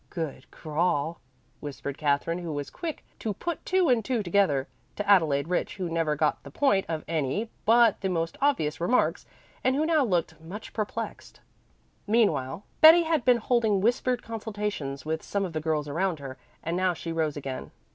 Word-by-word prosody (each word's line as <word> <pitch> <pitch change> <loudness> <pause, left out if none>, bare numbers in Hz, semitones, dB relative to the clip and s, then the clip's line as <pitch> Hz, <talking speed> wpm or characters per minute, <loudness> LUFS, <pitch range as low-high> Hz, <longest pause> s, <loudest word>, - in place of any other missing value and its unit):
"Good 160 -6 -5
crawl," 160 0 -1 0.4
whispered 140 -1 -6
Katherine, 150 +4 0
who 170 -2 -5
was 145 -1 -4
quick 330 -3 -6
to 215 -3 -3
put 345 - -4
two 370 -1 +3
and 240 -4 +3
two 240 -2 -1
together, 175 -8 +2 0.3
to 205 - -4
Adelaide 160 -8 +4
Rich, 180 - -1
who 180 -3 -3
never 165 -2 +1
got 150 +1 +1
the - - -11
point 205 -9 +2
of 160 -2 -3
any 165 - -1
but 230 -1 +5
the 190 - 0
most 165 -2 -1
obvious 170 - +1
remarks, 240 +9 +1 0.4
and 260 - +3
who 305 +3 +1
now 315 -3 +3
looked 170 - -1
much 185 +7 -9
perplexed. 215 -2 -5 0.7
Meanwhile 195 - +1 0.2
Betty 325 +2 +9
had 320 -5 +1
been 250 -1 +5
holding 225 -3 +2
whispered 240 +3 +1
consultations 210 - -4
with 160 +1 -2
some 200 -1 -2
of 175 - -6
the 155 - -2
girls 155 -2 -1
around 175 +3 0
her, 135 -2 -8 0.2
and 165 +1 -2
now 185 -1 +1
she 165 - -5
rose 160 -3 -1
again. 135 -2 -5
180 Hz, 175 wpm, -27 LUFS, 155-225 Hz, 0.7 s, Betty